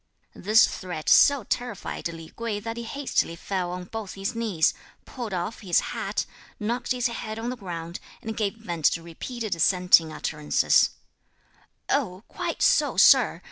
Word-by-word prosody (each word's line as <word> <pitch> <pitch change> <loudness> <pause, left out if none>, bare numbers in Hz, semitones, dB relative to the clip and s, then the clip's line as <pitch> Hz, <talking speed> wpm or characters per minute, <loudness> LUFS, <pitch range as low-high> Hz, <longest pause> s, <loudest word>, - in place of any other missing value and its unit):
This 215 +3 +5
threat 175 -4 -6
so 280 -4 +6
terrified 240 -3 -3
Li 165 -1 -9
Kuei 230 -3 -3
that 225 +2 -5
he 235 - -5
hastily 245 -7 -1
fell 180 0 -3
on 180 0 -5
both 210 +1 -7
his 195 +3 -3
knees, 215 -9 +1 0.3
pulled 240 -5 -6
off 185 +4 -3
his 185 -5 +3
hat, - - -2 0.3
knocked 235 +4 -2
his 250 -1 0
head 225 -3 -3
on 235 +2 -3
the - - -4
ground, 170 -5 -6 0.2
and 220 0 -4
gave 210 -1 -1
vent 175 -8 -5
to 165 - +3
repeated 215 +6 -5
assenting 170 -1 +4
utterances: 150 -1 +2 1.0
"Oh, 210 -9 -1
quite - - -3
so, - - +3
Sir! - - +6
205 Hz, 155 wpm, -26 LUFS, 175-230 Hz, 1.0 s, so